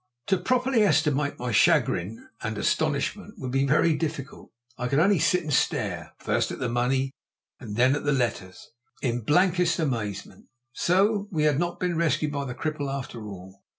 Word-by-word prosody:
To 190 Hz, -, +4 dB
properly 255 Hz, +4 st, +1 dB
estimate 150 Hz, -6 st, +2 dB
my 125 Hz, 0 st, -3 dB
chagrin 100 Hz, -1 st, +2 dB
and -, -, -3 dB
astonishment -, -, -1 dB
would 130 Hz, -, -5 dB
be 135 Hz, +1 st, +1 dB
very 155 Hz, +3 st, +3 dB
difficult. 150 Hz, -3 st, -5 dB, 0.3 s
I 125 Hz, -, -3 dB
could 135 Hz, -, 0 dB
only 190 Hz, +3 st, +4 dB
sit 180 Hz, +3 st, +2 dB
and 150 Hz, -2 st, -3 dB
stare, -, -, -1 dB
first -, -, 0 dB
at -, -, -5 dB
the 125 Hz, -, -2 dB
money 130 Hz, +3 st, 0 dB, 0.5 s
and 105 Hz, -5 st, -7 dB
then 130 Hz, +4 st, +4 dB
at 145 Hz, -, -4 dB
the 145 Hz, -, +1 dB
letters, 115 Hz, -9 st, -2 dB, 0.3 s
in 120 Hz, -2 st, 0 dB
blankest 175 Hz, -, +2 dB
amazement. 115 Hz, -, -3 dB, 0.3 s
So 200 Hz, -, +2 dB
we 160 Hz, -7 st, -1 dB
had 150 Hz, -2 st, +3 dB
not 175 Hz, 0 st, -2 dB
been 180 Hz, -2 st, -1 dB
rescued 160 Hz, -2 st, +1 dB
by 140 Hz, -1 st, -3 dB
the 125 Hz, -2 st, -5 dB
cripple 150 Hz, -2 st, -3 dB
after 120 Hz, -5 st, -6 dB
all. 95 Hz, 0 st, -11 dB
145 Hz, 175 wpm, -26 LUFS, 125-170 Hz, 0.5 s, To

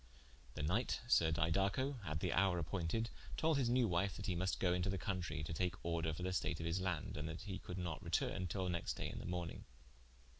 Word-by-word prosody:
The -, -, -2 dB
knight 100 Hz, +11 st, +1 dB
sir 80 Hz, -9 st, +5 dB
Didaco, 100 Hz, -, +2 dB
at 75 Hz, -3 st, -2 dB
the 90 Hz, -, +1 dB
houre 95 Hz, 0 st, +4 dB
appointed, 90 Hz, +7 st, -1 dB, 0.3 s
tolde 160 Hz, -2 st, +3 dB
his 125 Hz, -3 st, +2 dB
new 125 Hz, -1 st, +4 dB
wife 90 Hz, +2 st, +1 dB
that 100 Hz, -, -5 dB
he 95 Hz, -, +1 dB
must 95 Hz, +2 st, 0 dB
go 90 Hz, -2 st, +3 dB
into 90 Hz, +1 st, +1 dB
the 95 Hz, -, 0 dB
countrie, 85 Hz, -6 st, -2 dB
to 80 Hz, -, -3 dB
take 90 Hz, +1 st, 0 dB
order 85 Hz, -1 st, +1 dB
for 80 Hz, +3 st, -4 dB
the 95 Hz, 0 st, 0 dB
state 90 Hz, -2 st, 0 dB
of 80 Hz, -, -3 dB
his 85 Hz, +3 st, 0 dB
land, 95 Hz, -4 st, -1 dB
and 80 Hz, -, -2 dB
that 80 Hz, -, -5 dB
he 95 Hz, -3 st, -4 dB
could 90 Hz, -, -6 dB
not 85 Hz, -4 st, -3 dB
retourne, 95 Hz, -1 st, 0 dB
til 95 Hz, +3 st, -1 dB
the 90 Hz, -, 0 dB
next 80 Hz, -8 st, -1 dB
day -, -, -2 dB
in -, -, -5 dB
the -, -, -6 dB
morning. 85 Hz, -2 st, -3 dB
90 Hz, 235 wpm, -39 LUFS, 80-95 Hz, 0.3 s, sir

